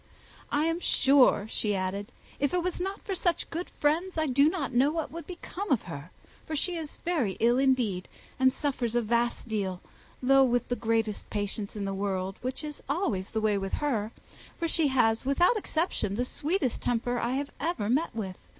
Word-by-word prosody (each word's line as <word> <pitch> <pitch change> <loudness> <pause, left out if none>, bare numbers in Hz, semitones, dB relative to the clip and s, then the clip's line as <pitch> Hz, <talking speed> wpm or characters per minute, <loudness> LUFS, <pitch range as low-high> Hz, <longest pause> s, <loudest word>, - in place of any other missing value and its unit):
"I 295 +2 +2
am 330 +1 0
sure," 270 - +4
she 210 -2 0
added, 195 +4 -3 0.3
"if 285 +4 +1
it 355 - +1
was 365 0 -2
not 385 +2 -3
for 395 - -3
such 350 -2 0
good 340 +2 -3
friends, 330 +5 0
I 315 - +2
do 280 +2 +4
not 290 -7 -3
know 260 +4 +4
what 320 0 -2
would 335 +2 -7
become 365 +1 -6
of 255 - +3
her, 150 -2 -7 0.4
for 315 - -2
she 350 +4 0
is 315 -3 -5
very 300 - +1
ill 240 +2 +4
indeed, 245 -9 +2 0.3
and 260 0 +5
suffers 255 -4 -2
a 240 - +3
vast 235 +2 0
deal, 195 -5 -2 0.4
though 270 +1 +6
with 245 -2 +1
the 245 - +1
greatest 225 -2 -1
patience 205 0 -3
in 205 -1 -3
the 195 - -2
world, 195 -1 -2
which 255 +4 -4
is 300 -1 -6
always 240 - 0
the 220 - -1
way 210 -2 +2
with 195 0 -4
her, 225 -7 0 0.5
for 335 - -1
she 320 -2 +3
has, 230 -4 +3
without 315 - +4
exception, 320 - -1
the 245 +3 0
sweetest 295 - -1
temper 245 0 0
I 260 +5 0
ever 330 -11 -1
met 280 +9 +2
with. 190 -5 -4
255 Hz, 195 wpm, -29 LUFS, 215-315 Hz, 0.5 s, though